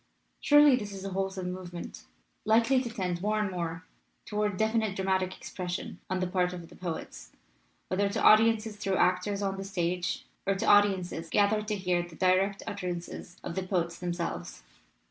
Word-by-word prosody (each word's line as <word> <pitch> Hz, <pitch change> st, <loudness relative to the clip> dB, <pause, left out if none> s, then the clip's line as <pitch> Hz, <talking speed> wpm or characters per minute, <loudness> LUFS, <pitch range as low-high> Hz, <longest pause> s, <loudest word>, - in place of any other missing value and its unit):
Surely 295 Hz, -2 st, +7 dB
this 205 Hz, -5 st, -4 dB
is 195 Hz, 0 st, -7 dB
a 195 Hz, -, -4 dB
wholesome 190 Hz, -1 st, -2 dB
movement, 175 Hz, -2 st, -8 dB, 0.4 s
likely 230 Hz, +4 st, +4 dB
to 245 Hz, -, -4 dB
tend 180 Hz, -6 st, -3 dB
more 215 Hz, +2 st, +1 dB
and 205 Hz, -2 st, 0 dB
more 170 Hz, -1 st, -4 dB, 0.4 s
toward 210 Hz, -2 st, -1 dB
definite 220 Hz, -1 st, +1 dB
dramatic 190 Hz, -1 st, 0 dB
expression 180 Hz, -1 st, -5 dB
on 185 Hz, 0 st, 0 dB
the 185 Hz, -, 0 dB
part 180 Hz, 0 st, 0 dB
of 175 Hz, -2 st, -8 dB
the -, -, -14 dB
poets, 175 Hz, -3 st, -6 dB, 0.6 s
whether 200 Hz, +2 st, +1 dB
to 215 Hz, +3 st, -2 dB
audiences 220 Hz, 0 st, +5 dB
through 195 Hz, -2 st, -1 dB
actors 195 Hz, +3 st, +1 dB
on 195 Hz, -1 st, -1 dB
the 195 Hz, -, -4 dB
stage, 180 Hz, -2 st, -2 dB, 0.2 s
or 195 Hz, -, +3 dB
to 195 Hz, -, -2 dB
audiences 190 Hz, -5 st, +3 dB
gathered 210 Hz, +2 st, +2 dB
to 210 Hz, -, 0 dB
hear 180 Hz, -3 st, 0 dB
the 175 Hz, -1 st, -9 dB
direct 190 Hz, +3 st, +2 dB
utterances 175 Hz, -2 st, -5 dB
of -, -, -4 dB
the 190 Hz, -, -2 dB
poets 175 Hz, -3 st, -1 dB
themselves. 170 Hz, -, -4 dB
190 Hz, 170 wpm, -29 LUFS, 180-210 Hz, 0.6 s, Surely